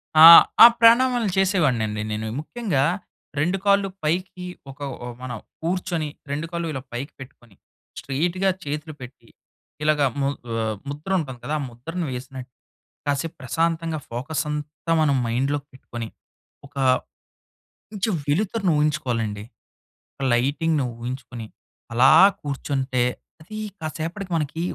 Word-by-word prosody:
ఆ! 155 +1 +10 0.4
ఆ - - +14
ప్రాణామాలు 235 0 +5
చేసేవాడినండి 135 - +1
నేను. 110 +1 -3
ముఖ్యంగా 155 - -1 0.6
రెండు 175 +6 +1
కాళ్ళు 200 -1 +3 0.2
పైకి 180 +3 -2 0.3
ఒక 135 - -17 0.3
ఒ - - -5
మన 130 - -6 0.3
కూర్చొని 170 -2 -1 0.2
రెండు 150 +3 -2
కాళ్ళు 170 -1 -3
ఇలా 130 - -4
పైకి 135 +5 -5
పెట్టుకొని, 120 -5 -14 0.4
స్ట్రెయిట్‌గా 175 +8 0
చేతులు 150 +2 -5
పెట్టి 125 -2 -12 0.6
ఇలాగా 150 -2 +3 0.2
ము 135 - +2 0.3
ఆహ్, 110 -1 -2
ముద్ర 150 +6 -7
ఉంటుంది 130 -6 -6
కదా! 155 - -2
ఆ - - -3
ముద్రను 165 +9 -5
వేసినట్టు, 130 0 -7 0.6
కాసేపు 145 +3 -1
ప్రశాంతంగా 165 +3 -1
ఫోకస్ 135 +6 -2
అంతా 150 +2 -4
మనం 145 -3 +3
మైండ్‌లో 135 +5 0
పెట్టుకొని, 120 -3 -7 0.6
ఒక 140 - -31 1.2
కొంచెం 210 0 -1
వెలుతురని 190 +4 +1
ఊహించుకోవాలండి. 125 -9 -1 0.9
లైటింగ్‌ను 145 +3 +1
ఊహించుకొని, 120 -2 -6 0.5
అలా 130 +3 +6 0.3
కూర్చుంటే. 135 -3 -1 0.4
అది 215 +7 -9 0.2
కాసేపటికి 165 +5 -5
మనకి 155 +2 -3
150 Hz, 115 wpm, -23 LUFS, 130-170 Hz, 1.2 s, ఆ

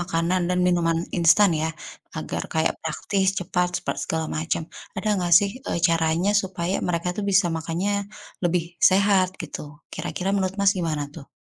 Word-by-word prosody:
makanan 175 +1 0
dan 180 - +1
minuman 170 -2 +2 0.2
instan 175 +4 +5
ya 160 - 0 0.5
agar - - -4
kayak 160 0 +1
praktis, 190 +5 -1
cepat, 180 0 0
sepet - - -3
segala 160 0 -2
macam. 160 +1 -1 0.4
Ada 215 - -2
gak 175 -1 -1
sih, 200 0 0 0.2
eee, - - -1
caranya 165 +3 +2
supaya 185 -1 -3
mereka 170 0 -1
tuh 210 - -2
bisa 190 -1 +4
makannya 165 +5 -2 0.5
lebih 175 0 +2 0.3
sehat 195 -1 +4
gitu, 155 - -6 0.3
kira-kira 185 - -3
menurut 190 -1 0
Mas, 200 0 +5
gimana 155 -4 -1
tuh? 145 -4 -11
175 Hz, 160 wpm, -24 LUFS, 165-190 Hz, 0.5 s, instan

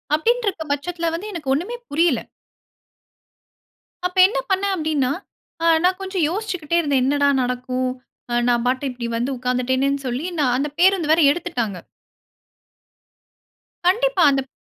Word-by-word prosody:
அப்டீன்ருக்க 415 -2 0
பட்சத்துல 335 +3 -2
வந்து 415 +5 -6
எனக்கு 300 -6 -3
ஒண்ணுமே 390 +11 -3
புரியல. 305 -4 +2 1.9
அப்ப 365 - -16
என்ன 480 +5 -4
பண்னே 385 +1 +1
அப்டீன்னா, 305 -5 0 0.5
ஆ - - +2 0.2
நான் 370 +1 +2
கொஞ்சம் 380 -3 -2
யோசிச்சிக்கிட்டே 360 -5 -2
இருந்தேன் 280 -4 +1
என்னடா 285 +1 +2
நடக்கும்? 250 +1 -2 0.4
ஆ - - -1 0.2
நான் 240 0 +1
பாட்டு 260 +2 0
இப்படி 240 -1 -5
வந்து 250 +4 -1
உட்கார்ந்துட்டேனேன்னு 260 +2 0
சொல்லி 255 +7 -3
நான் 250 -4 +2
அந்த 290 +2 -1
பேருந்து 360 -4 +4
வேற 325 +1 +4
எடுத்துட்டாங்க. 245 - -3 2.1
கண்டிப்பா. 465 0 +2
அந்தப் 270 -1 -1
295 Hz, 125 wpm, -21 LUFS, 255-360 Hz, 2.1 s, பேருந்து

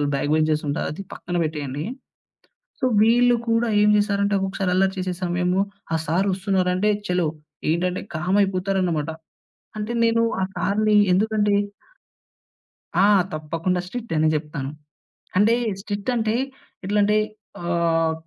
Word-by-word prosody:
Back 145 +2 -1
benchers 155 -1 +1
ఉంటారు. 145 - -1
అది 170 - -7
పక్కన 175 0 -4
పెట్టేయండి. 145 -2 -3 1.0
సో, 255 - 0 0.2
వీళ్ళు 240 +2 +5
కూడా 230 +1 +2
ఏం 210 - +5
జేసారంటే 200 -1 +1
ఒక్కొక్కసారి 190 -1 -1
అల్లరి 190 +1 +2
చేసే 185 -1 -2
సమయము 180 +1 +1 0.3
ఆ - - +3
సారు 185 +6 +1
ఒస్తున్నారంటే 190 0 +1 0.2
చలో 180 -2 +1 0.4
ఏంటంటే 180 +3 0
కామ్ 175 +5 0
అయిపోతారన్నమాట. 185 -5 0 0.7
అంటే 215 +2 -3
నేను 230 0 +3 0.2
ఆ - - +1
సారుని 215 +1 +2 0.2
ఎందుకంటే 210 +1 +2 1.5
ఆ! - - +7 0.3
తప్పకుండా 165 +4 -1
స్ట్రిక్ట్ 235 -1 -5
అనే 155 - +3
జెప్తాను. 150 -3 -4 0.7
అంటే 210 +4 +5 0.3
స్ట్రిక్ట్ 205 +3 -3
అంటే 220 -1 0 0.5
ఎట్లాంటే 205 +1 +2 0.4
ఆహ్, 165 -1 +1
185 Hz, 120 wpm, -23 LUFS, 165-210 Hz, 1.5 s, ఆ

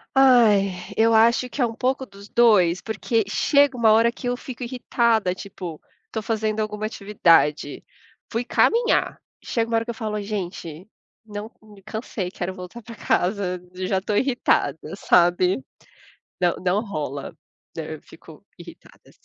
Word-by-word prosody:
Ai, 230 -7 +5 0.3
eu 225 +1 +4
acho 235 +3 +4
que 275 - -4
é 245 - +4
um 230 - -4
pouco 260 +3 -1
dos 200 -2 -14
2, 205 -7 +4
porque 225 +1 -1
chega 280 +4 +3
uma 220 -2 +5
hora 230 +1 +4
que 245 - -7
eu 245 - 0
fico 255 0 -9
irritada, 235 -5 +1
tipo, 185 -4 -8 0.3
tô 220 - -3
fazendo 220 0 -1
alguma 215 0 -3
atividade, 170 -9 +2 0.5
fui 230 +1 -2
caminhar. 460 - +2 0.2
Chega 230 -1 -2
uma 230 - 0
hora 225 - -1
que 235 - -3
eu - - -9
falo 215 -3 -3
gente, 185 -5 -6 0.4
não 210 0 -7
me 210 -2 -16
cansei, 215 -3 -5
quero 185 0 -5
voltar 185 +6 -9
para 230 - -10
casa, 180 -2 -1
já 185 +1 -1
estou 205 +2 -2
irritada, 260 0 +1 0.2
sabe? 175 -3 +3 0.8
Não, 175 -1 +2
não 185 +3 0
rola, 145 -8 -5 0.4
né? - - -5
Eu - - -12
fico - - -16
irritada. - - -15
215 Hz, 155 wpm, -23 LUFS, 185-235 Hz, 0.8 s, Ai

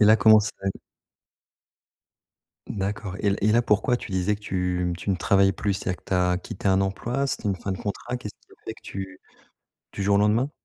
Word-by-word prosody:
Et - - +7
là, 110 +1 +7
comment 110 +1 +7
c'est? 105 - -3 2.2
D'accord. 100 0 -3
Et 105 - +1
l 100 - +1
et 105 +1 +4
là, 120 +1 +4
pourquoi 110 +3 +2
tu - - -9
disais 95 +2 +1
que 105 - -10
tu, 90 -2 -1
mmh, 85 -1 -2
tu 95 - -3
ne 95 - +3
travailles 95 +2 +3
plus? 100 +1 -1
C'est-à-dire 90 -2 -3
que - - -25
tu 95 - 0
as 90 0 +2
quitté 100 +2 -7
un 95 0 +4
emploi? 120 +8 -1
C'était - - -3
une 100 - +1
fin 95 - -5
de 95 - -3
contrat? 105 +4 -4
Qu'est-ce 110 -5 -8
qui - - -49
a - - -15
fait - - -5
que - - -19
tu 95 -1 -7 0.7
du 100 - -4
jour 100 0 +3
au - - +4
lendemain? 110 +7 +2
100 Hz, 230 wpm, -25 LUFS, 95-105 Hz, 2.2 s, Et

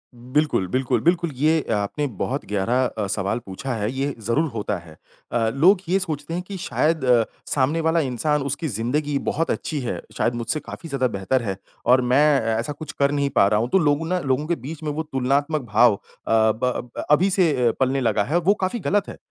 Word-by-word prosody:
बिल्कुल, 130 -3 0
बिल्कुल, 130 -1 +1
बिल्कुल। 170 -1 +1
ये 155 +3 +2
आपने 105 +9 -1
बहुत 135 +3 -2
गहरा 115 +6 +1
अ, 105 -4 -3
सवाल 100 +3 -1
पूछा 120 +7 -5
है, 105 0 -2
ये 135 +2 -2
ज़रूर 150 +7 +1
होता 105 -3 -3
है 85 -2 -14 0.3
अ, 115 -2 +1
लोग 180 - +4
ये 190 - +3
सोचते 155 -3 -4
हैं 175 - -1
कि 200 -2 -6
शायद 160 -3 0
अ, 120 -2 +5 0.2
सामने 145 +4 +1
वाला 160 +1 +2
इंसान, 145 +2 0
उसकी 145 +4 -2
ज़िंदगी 140 +5 -1
बहुत 165 +2 0
अच्छी 155 - -3
है, 125 -3 -3 0.2
शायद 120 - +1
मुझसे 120 +6 -2
काफ़ी 165 - -9
ज़्यादा 135 -3 +1
बेहतर 125 +7 0
है 95 -3 -3 0.3
और 130 +1 +5
मैं 125 +4 +3 0.3
ऐसा 140 +6 -2
कुछ 150 0 -8
कर 140 0 +3
नहीं 140 -1 0
पा 100 -7 +4
रहा 105 +1 +2
हूँ, 120 +2 -1
तो - - +4
लोगों 150 0 +1
ना 180 +1 0
लोगों 135 0 0
के 170 - +1
बीच 155 +5 -8
में 150 - -1
वो 155 +2 -3
तुलनात्मक 145 +2 0
भाव 110 -1 +5
अ, - - -12 0.3
ब 110 0 +3
ब 125 -1 -1 0.2
अभी 170 +6 +4
से 180 -4 +3 0.2
अ, 115 - +4
पलने 135 +1 +1
लगा 110 -4 +2
है, 155 +9 0
वो 180 +4 +3
काफ़ी 190 +6 -1
ग़लत 205 +1 0
है। - - -9
140 Hz, 215 wpm, -23 LUFS, 120-155 Hz, 0.3 s, अ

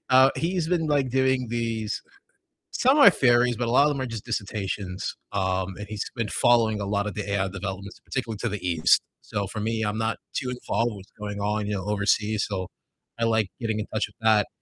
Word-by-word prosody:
Uh, 130 +1 +7
he's 170 -1 -1
been, 170 -3 +1
like, 140 -3 +2
doing 130 0 +2
these 115 -2 -2 0.7
some 265 +4 +3
are 275 -9 +9
theories, 120 -3 +3
but 120 +1 -2
a 115 - 0
lot 135 +3 +6
of 150 - +4
them 140 -2 -2
are 130 - -2
just 115 -2 -6
dissertations, 100 -4 -3 0.2
um, 95 -1 -1
and 105 - -6
he's 105 -1 -3
been 115 -4 -2
following 110 -2 +3
a 100 - -2
lot 100 0 0
of 105 - -3
the 105 -1 -4
AI 100 -1 +1
developments, 95 0 -6
particularly 115 -5 -4
to - - -1
the 105 - -3
east. 85 -3 +4 0.2
So, 100 -1 -3
for 110 - -6
me, 110 +1 -1
I'm 105 +1 -1
not 110 0 0 0.2
too 130 -2 -2
involved 120 -2 -1
with 95 -1 -11
going 105 -1 -5
on, 105 0 -1
you 105 - -1
know, 95 0 -4
overseas, 105 +1 +1
so 95 -2 -3 0.5
I 115 - +2
like 110 -3 +2
getting 110 -3 -1
in 105 - -2
touch 110 - 0
with - - -22
that. 110 -2 +4
110 Hz, 220 wpm, -26 LUFS, 100-120 Hz, 0.7 s, are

